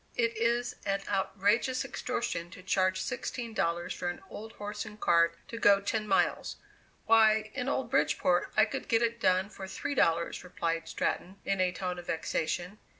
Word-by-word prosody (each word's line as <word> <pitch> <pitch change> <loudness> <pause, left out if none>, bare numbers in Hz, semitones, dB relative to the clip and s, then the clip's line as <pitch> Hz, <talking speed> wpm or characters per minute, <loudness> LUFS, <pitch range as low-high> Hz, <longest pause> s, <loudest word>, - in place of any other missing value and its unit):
"It 230 -1 +1
is 235 +2 0
an 195 -1 -1
outrageous 205 +6 +1
extortion 235 -9 -3
to 185 +1 -12
charge 185 -1 +2
sixteen 240 +1 -4
dollars 170 -3 -1
for 175 - -3
an 175 - -5
old 220 +1 -8
horse 210 0 -5
and 210 0 -11
cart 170 -2 +3
to 230 - -6
go 200 -2 +6
ten 215 +2 -2
miles. 195 - +1 0.5
Why, 220 -1 +5
in 265 -1 -2
old - - -1
Bridgeport - - +2
I - - +7
could - - -5
get 230 0 +3
it 235 0 0
done 185 +1 +3
for 195 -2 -8
three 240 - -4
dollars," 170 -11 +1
replied 165 -2 -2
Stratton, 190 +2 -2
in 195 -1 +1
a 180 -1 +2
tone 180 0 -4
of 175 - -11
vexation. 175 +4 -2
200 Hz, 175 wpm, -30 LUFS, 180-225 Hz, 0.5 s, I